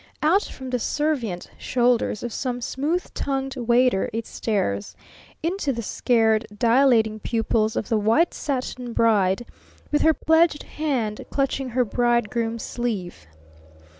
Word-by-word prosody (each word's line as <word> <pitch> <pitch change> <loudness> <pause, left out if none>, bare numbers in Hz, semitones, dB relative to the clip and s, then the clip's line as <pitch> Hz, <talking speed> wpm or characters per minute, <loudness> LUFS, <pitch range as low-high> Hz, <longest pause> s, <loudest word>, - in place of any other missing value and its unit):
Out 360 +7 +4
from 260 -1 -8
the 250 - 0
servient 250 - -1
shoulders 245 -4 +1
of 240 -2 -4
some 250 -2 -2
smooth 295 +8 -1
tongued 270 -1 -2
Waiter 245 -3 +2
it 225 +1 -3
stares, 100 - -2 0.5
into 335 -3 0
the 235 -2 -4
scared 225 -1 +2
dilating 230 -2 +3
pupils 220 0 0
of - - -3
the 225 - +2
White 225 +12 +3
Satin 255 -3 -4
Bride 210 -2 +2 0.5
with 295 - +2
her 320 -1 +4
pledged 320 -2 +3
hand 255 -9 -2
clutching 275 -1 -1
her 250 +1 +1
Bridegroom's 235 0 0
sleeve. 200 - -4
240 Hz, 130 wpm, -24 LUFS, 220-270 Hz, 0.5 s, Out